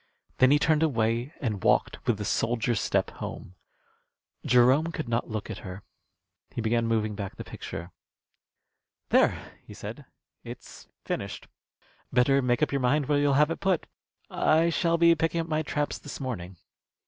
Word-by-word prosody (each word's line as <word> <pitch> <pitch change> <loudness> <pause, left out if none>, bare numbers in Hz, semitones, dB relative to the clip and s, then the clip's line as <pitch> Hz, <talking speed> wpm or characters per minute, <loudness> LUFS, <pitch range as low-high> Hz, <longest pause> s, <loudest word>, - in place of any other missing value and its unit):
Then 130 - +6
he 145 - +6
turned 155 +1 +2
away 120 -3 +1
and 105 -8 -2
walked - - +2
with 120 - +2
the 105 - -4
soldier's 115 +1 0
step - - 0
home. 90 - -7 0.9
Jerome 125 +6 +4
could 155 -5 -5
not 115 +1 -1
look 110 0 -4
at 105 - -6
her. 95 0 -8 0.7
He - - -7
began 115 +1 +1
moving 110 -2 0
back 100 -2 -6
the - - -7
picture. 85 +2 -8 1.2
"There!" - - +4 0.2
he - - -12
said, - - -8 0.4
"it's - - -11 0.2
finished. - - -4 0.6
Better 135 +2 +4
make 125 +2 +1
up - - +1
your 140 -1 0
mind 140 +4 +2
where 145 +1 +2
you'll 145 -1 +3
have 150 +3 +4
it - - -3
put. 190 -4 +1 0.4
I 165 +2 +2
shall 170 0 +1
be 170 0 +6
picking 165 +1 0
up 165 - -6
my 155 -1 0
traps 145 -1 -2
this 145 - -8
morning." 95 -9 -5
130 Hz, 165 wpm, -27 LUFS, 115-150 Hz, 1.2 s, Then